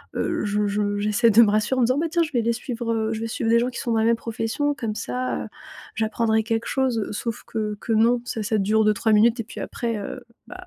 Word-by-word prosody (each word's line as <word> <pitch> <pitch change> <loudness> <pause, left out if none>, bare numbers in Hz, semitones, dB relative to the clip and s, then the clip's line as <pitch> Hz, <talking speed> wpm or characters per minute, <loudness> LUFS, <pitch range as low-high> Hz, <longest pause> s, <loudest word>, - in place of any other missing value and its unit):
Heu, 335 -7 -1
je 205 0 0
je 205 0 -1
j'essaie 215 +3 +3
de 225 +3 +7
me 210 - +5
rassurer 215 +5 +1
en - - +3
me 235 - +3
disant: 255 +2 +1
«Bah 330 - 0
tiens, 340 0 +2
je 310 - -5
vais 240 - +2
les 235 +1 +1
suivre, 235 -1 -3
heu, 220 0 -1
je 220 - -4
vais 230 - -2
suivre 225 0 -2
des 235 - +5
gens 240 - +1
qui 245 - -7
sont 235 - -2
dans 225 - +2
la 220 - +2
même 230 - +4
profession, 230 +6 -2
comme 225 -6 -4
ça, 255 +3 -3
heu, - - -7 0.5
j'apprendrai 220 0 +1
quelque 225 +1 -2
chose». 255 -5 0
Sauf 225 +1 -4
que 215 -2 -3
que 230 - -4
non, 235 +2 +3
ça 225 -3 -4
ça 220 +1 0
dure 215 +2 +2
2-3 215 +1 +2
minutes 225 +3 +4
et - - -6
puis - - -9
après, 230 -2 -3
heu, 210 +5 -6 0.3
bah, 370 0 -10
225 Hz, 270 wpm, -23 LUFS, 215-240 Hz, 0.5 s, de